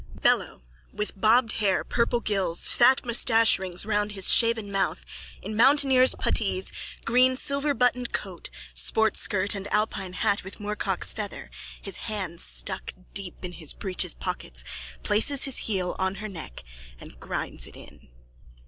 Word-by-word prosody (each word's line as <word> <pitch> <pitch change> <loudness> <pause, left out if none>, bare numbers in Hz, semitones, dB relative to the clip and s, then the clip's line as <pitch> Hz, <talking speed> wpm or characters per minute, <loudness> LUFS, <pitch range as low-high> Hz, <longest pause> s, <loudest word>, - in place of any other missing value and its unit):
_ - - -16
BELLO: - - +1 0.3
_(With 210 - -3
bobbed 225 +4 +3
hair, 195 -3 +1
purple 235 0 0
gills, 195 -6 0
fat 260 +2 +4
moustache 230 -3 +4
rings 185 0 -3
round 210 -1 -1
his 195 -2 +5
shaven 230 -3 +2
mouth, 195 -1 -2 0.4
in 215 - -5
mountaineer's 265 +1 +5
puttees, 195 -3 +1 0.3
green 250 +2 +4
silverbuttoned 265 -3 +1
coat, - - -5 0.2
sport 220 -1 +1
skirt 200 0 +2
and 200 0 -7
alpine 195 -3 -1
hat 200 +1 0
with 190 - -9
moorcock's 210 0 -1
feather, - - -7 0.3
his 195 -3 -2
hands 190 -6 -5
stuck 190 -1 -3 0.2
deep 190 -2 -4
in 180 - -5
his 160 -4 -3
breeches 185 -2 -1
pockets, 65 - -5 0.4
places 225 +7 +2
his 270 -2 -1
heel 185 -4 -2
on 190 0 -1
her 215 +2 -7
neck 165 - -9 0.4
and - - -13
grinds - - -5
it - - -14
in.) - - -13
210 Hz, 150 wpm, -25 LUFS, 190-235 Hz, 0.4 s, his